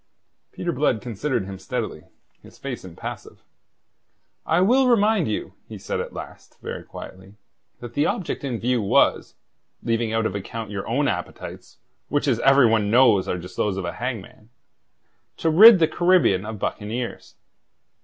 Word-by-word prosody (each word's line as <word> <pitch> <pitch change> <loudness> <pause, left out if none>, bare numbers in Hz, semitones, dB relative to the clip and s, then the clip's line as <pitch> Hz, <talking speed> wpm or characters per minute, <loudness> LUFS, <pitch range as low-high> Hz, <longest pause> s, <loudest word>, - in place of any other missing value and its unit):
Peter - - -3
Blood 110 - +1
considered 120 -1 -3
him 95 -1 -8
steadily, 95 - -5 0.4
his - - -17
face 135 -3 -6
impassive. 90 -3 -9 1.0
"I 165 - +3
will 250 +8 +4
remind 220 -6 +3
you," 105 - -4
he - - -8
said - - -4
at - - -4
last, - - -11
very - - -6
quietly, 95 +2 -11 0.5
"that 120 -1 -8
the 145 +3 +1
object 180 - -3
in 125 -5 -3
view 125 0 0
was 100 - +2 0.5
leaving 115 -1 0
out 115 0 0
of 100 - -1
account 105 +2 -6
your 100 -2 -5
own - - +1
appetites - - -6 0.3
which, 145 0 0
as 120 -4 +2
every 135 -1 +5
one 110 -2 +2
knows, 115 -5 +4
are 90 - -1
just 90 +1 -10
those 100 -2 0
of 95 - -3
a 85 - -3
hangman 115 -3 -6 0.9
to 165 - +1
rid 215 +6 +9
the 165 -2 +3
Caribbean 175 - +2
of 110 -1 -5
buccaneers. 115 +5 -5
115 Hz, 160 wpm, -23 LUFS, 105-145 Hz, 1.0 s, rid